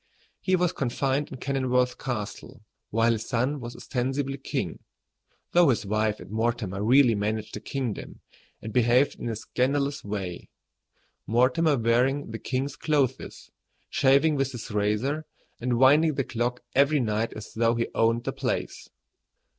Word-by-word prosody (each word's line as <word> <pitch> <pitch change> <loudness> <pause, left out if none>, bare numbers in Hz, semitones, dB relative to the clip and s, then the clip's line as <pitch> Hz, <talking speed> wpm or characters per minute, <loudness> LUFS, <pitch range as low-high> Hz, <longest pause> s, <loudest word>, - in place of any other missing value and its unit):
He 185 - +2
was 180 -1 +1
confined 135 +2 -1
in 130 - -6
Kenilworth 125 -1 0
Castle, 110 -5 -5 0.3
while 115 +2 +3
his 110 -1 -3
son 130 +4 0
was 120 -1 -7
ostensibly 135 +2 -2
king, - - -3 0.7
though 175 -3 +5
his 115 -4 +1
wife 110 +1 0
and - - -11
Mortimer 110 -3 -1
really 125 +1 +5
managed 105 +1 -2
the - - -4
kingdom 120 -1 -5 0.4
and 110 - -6
behaved 125 +3 +3
in - - -3
a 115 - -2
scandalous 140 +5 -1
way, 95 -4 -5 0.8
Mortimer 130 +7 +3
wearing 125 +3 +1
the 115 - -5
king's 135 +2 -2
clothes, 140 -5 -1 0.4
shaving 140 +4 +4
with 135 -2 -1
his 115 -2 -7
razor, 105 +9 0 0.3
and 120 0 0
winding 145 +4 +5
the 135 - 0
clock 120 0 -2
every 140 +2 +4
night 110 -1 -1
as 110 0 -9
though 115 +1 +2
he 115 0 0
owned 115 +1 +2
the - - -3
place. - - -3
125 Hz, 145 wpm, -26 LUFS, 115-140 Hz, 0.8 s, though